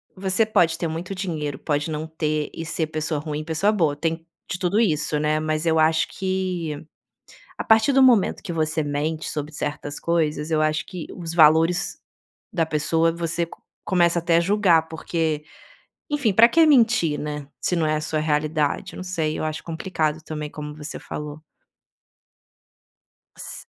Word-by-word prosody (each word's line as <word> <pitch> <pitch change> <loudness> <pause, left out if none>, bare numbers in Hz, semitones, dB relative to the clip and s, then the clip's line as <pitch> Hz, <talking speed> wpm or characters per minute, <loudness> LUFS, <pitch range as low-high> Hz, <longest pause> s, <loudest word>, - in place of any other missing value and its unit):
você 190 +3 +1
pode 170 -6 +2
ter 170 - -2
muito 170 +4 -5
dinheiro, 155 -7 -3
pode 145 +1 -1
não 155 0 -3
ter 155 -1 -2
e 165 - -5
ser 160 0 -2
pessoa 155 0 -2
ruim 150 0 -4
e - - -5
pessoa 165 +6 +1
boa 165 -9 +1
tem 165 +2 -2 0.2
de 185 - -3
tudo 185 +3 +1
isso, 155 -7 +1
né. 155 +1 +1
Mas 155 +1 -1
eu 160 -1 +3
acho 160 +1 +3
que 185 -5 -3 0.7
a - - -3
partir 220 +5 +4
do 270 0 +5
momento 240 -7 +4
que 175 - -5
você 155 -1 0
mente 150 +2 -2
sobre 150 +1 -4
certas 145 -1 -4
coisas 160 -2 0
eu 155 -1 +2
acho 155 +1 0
que 180 -4 -7
os 165 -2 -6
valores 165 +3 +4 0.5
da 170 -5 +1
pessoa 160 +2 +1
você 170 0 -2
co - - -14 0.2
começa 175 -2 +3
até 170 0 +2
a - - +5
julgar 175 -3 +3
porque, 160 -1 -2 0.7
enfim 285 -8 +1
pra 225 +4 +8
que 330 +5 +5
mentir, 230 - +4
né, 150 -1 -5
se 180 - 0
não 165 -2 +1
é 155 - +1
a - - -4
sua 155 0 -2
realidade? 155 +3 0
Eu - - -9
não - - -6
sei, 165 -4 -2
eu - - -3
acho 155 0 -4
complicado 160 -2 -2
também 150 -1 -5
como 150 0 -7
você 150 -1 -7
falou. 150 0 -7 2.0
S - - -7
160 Hz, 175 wpm, -23 LUFS, 155-180 Hz, 2.0 s, pra